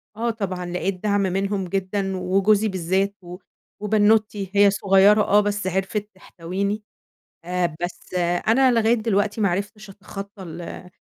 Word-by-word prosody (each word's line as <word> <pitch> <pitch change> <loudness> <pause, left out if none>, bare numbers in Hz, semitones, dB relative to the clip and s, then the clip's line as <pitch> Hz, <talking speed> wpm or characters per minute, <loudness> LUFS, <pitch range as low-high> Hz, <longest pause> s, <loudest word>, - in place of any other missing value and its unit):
آه 235 +2 -1
طبعًا، 190 -5 -3
لقيت 180 +2 -3
دعم 205 -1 +2
منهم 195 +1 -1
جدًا، 195 +1 -2
وجوزي 195 +4 +2
بالذات 190 +1 -1
و 180 0 -9 0.4
وبنّوتتي، 210 -1 +2
هي 200 0 +6
صغيرة 195 +1 +4
آه 205 0 +4
بس 205 -1 -2
عرفِت 195 +3 -2
تحتويني، 195 +3 -4 0.6
آآ، 175 -2 -1
بس 175 +1 -6 0.3
أنا 255 +3 +5
لغاية 230 0 +3
دلوقتي 215 -1 0
ما 200 - +3
عرفتش 205 +3 -4
أتخطى 200 0 -9
ال 175 +1 -8
200 Hz, 135 wpm, -23 LUFS, 185-210 Hz, 0.6 s, هي